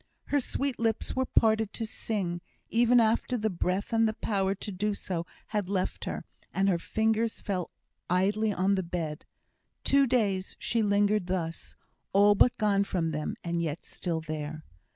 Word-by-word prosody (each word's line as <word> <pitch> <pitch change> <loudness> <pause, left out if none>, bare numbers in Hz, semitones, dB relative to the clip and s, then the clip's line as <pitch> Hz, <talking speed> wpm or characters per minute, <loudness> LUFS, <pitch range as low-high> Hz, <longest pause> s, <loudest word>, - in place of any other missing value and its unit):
Her 290 - +5
sweet 275 0 -2
lips 225 -1 0
were 260 0 0
parted 220 -2 +3
to 225 - -3
sing, 190 -6 -3 0.3
even 240 +1 +5
after 230 +2 +2
the 220 -1 0
breath 185 +5 -1
and 225 0 +4
the 215 - -4
power 195 -3 0
to 205 +2 -6
do 205 +2 -1
so 170 -3 -4 0.2
had 210 -4 -1
left 190 -2 -1
her, - - -4 0.3
and 195 +1 +1
her 180 -3 +2
fingers 220 +4 0
fell 185 -4 -2 0.4
idly 205 +4 +2
on 190 +1 +2
the 190 - +1
bed. 170 -3 -4 0.6
Two 275 0 +4
days 205 -6 +1
she 230 - +1
lingered 205 -2 +2
thus 170 -3 -3 0.4
all 205 +1 +6
but 235 +4 +4
gone 200 -2 +3
from 170 -5 -1
them, 150 0 -3
and 170 0 -1
yet 160 -1 -3
still 165 -3 -3
there. 155 0 -5
200 Hz, 170 wpm, -29 LUFS, 180-220 Hz, 0.6 s, all